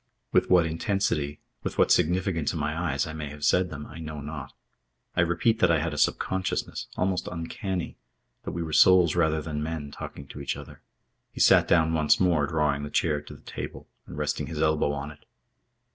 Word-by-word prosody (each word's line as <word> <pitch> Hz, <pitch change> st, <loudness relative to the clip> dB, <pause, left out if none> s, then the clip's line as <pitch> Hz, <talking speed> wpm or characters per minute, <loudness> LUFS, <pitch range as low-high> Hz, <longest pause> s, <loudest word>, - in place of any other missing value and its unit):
With -, -, +3 dB
what 90 Hz, -2 st, +5 dB
intensity, 80 Hz, -3 st, -1 dB, 0.2 s
with -, -, -5 dB
what -, -, +4 dB
significance 90 Hz, -2 st, +2 dB
in 80 Hz, -, -3 dB
my 75 Hz, +3 st, -1 dB
eyes, 70 Hz, -1 st, 0 dB
I 80 Hz, -, -6 dB
may 75 Hz, -2 st, -5 dB
have 75 Hz, 0 st, -5 dB
said 90 Hz, +4 st, +3 dB
them, 75 Hz, -2 st, -7 dB
I 80 Hz, -, -10 dB
know 75 Hz, -2 st, -6 dB
not. 70 Hz, -2 st, -7 dB, 0.6 s
I 90 Hz, -, +3 dB
repeat 90 Hz, +7 st, +2 dB
that 95 Hz, -, +4 dB
I 85 Hz, -, +4 dB
had 80 Hz, +1 st, -2 dB
a -, -, -5 dB
subconsciousness, 95 Hz, +4 st, -1 dB
almost 90 Hz, 0 st, 0 dB
uncanny, 90 Hz, +1 st, -4 dB, 0.5 s
that -, -, -4 dB
we 85 Hz, -, -3 dB
were 80 Hz, -1 st, -5 dB
souls 90 Hz, -2 st, +6 dB
rather 80 Hz, -3 st, +2 dB
than 75 Hz, -1 st, -4 dB
men, 75 Hz, -2 st, -4 dB
talking 70 Hz, -, -8 dB
to -, -, -8 dB
each -, -, -2 dB
other. -, -, -11 dB, 0.5 s
He -, -, -10 dB
sat -, -, +6 dB
down 80 Hz, -2 st, +3 dB
once 75 Hz, -2 st, +3 dB
more, 85 Hz, -6 st, +3 dB
drawing 75 Hz, -2 st, +1 dB
the 75 Hz, -, -5 dB
chair 75 Hz, -2 st, +1 dB
to 75 Hz, -, -11 dB
the -, -, -16 dB
table -, -, -7 dB, 0.2 s
and 70 Hz, -, -9 dB
resting 75 Hz, -1 st, -2 dB
his 80 Hz, -2 st, -5 dB
elbow 80 Hz, -2 st, +2 dB
on 70 Hz, +1 st, -4 dB
it. 75 Hz, -, -17 dB
80 Hz, 205 wpm, -27 LUFS, 75-85 Hz, 0.6 s, souls